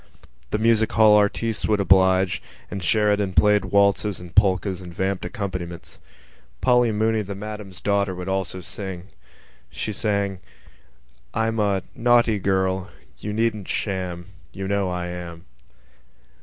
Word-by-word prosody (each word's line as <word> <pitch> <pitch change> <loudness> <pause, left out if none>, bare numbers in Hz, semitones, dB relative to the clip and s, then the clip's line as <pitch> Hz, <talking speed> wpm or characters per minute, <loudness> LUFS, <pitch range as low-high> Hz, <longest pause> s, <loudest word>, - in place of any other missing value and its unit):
The - - 0
music 110 0 +3
hall 110 -1 +6
artistes 105 +2 +1
would 105 -1 +2
oblige; 95 -1 +3 0.3
and 95 -2 -5
Sheridan 105 0 +2
played 105 +3 +4
waltzes 100 0 +2
and 90 -1 -11
polkas 95 -2 +2
and 90 -1 -9
vamped 95 +1 -2
accompaniments. 90 -3 -6 0.6
Polly 125 -2 +3
Mooney, 110 +1 +1
the 100 -1 -6
Madam's 105 -2 -8
daughter, 100 -2 0
would 90 +1 -6
also 95 -1 -2
sing. 95 -1 -7 0.6
She 105 - -4
sang: 100 -2 -1 1.0
_I'm 115 0 0
a... 100 -3 +1
naughty 120 -3 +3
girl. 95 0 0 0.3
You 105 - -5
needn't 110 -2 -1
sham: 90 -3 -3 0.2
You 95 0 -5
know 100 -1 0
I 90 -1 -3
am. 90 -1 -7
100 Hz, 130 wpm, -23 LUFS, 95-105 Hz, 1.0 s, hall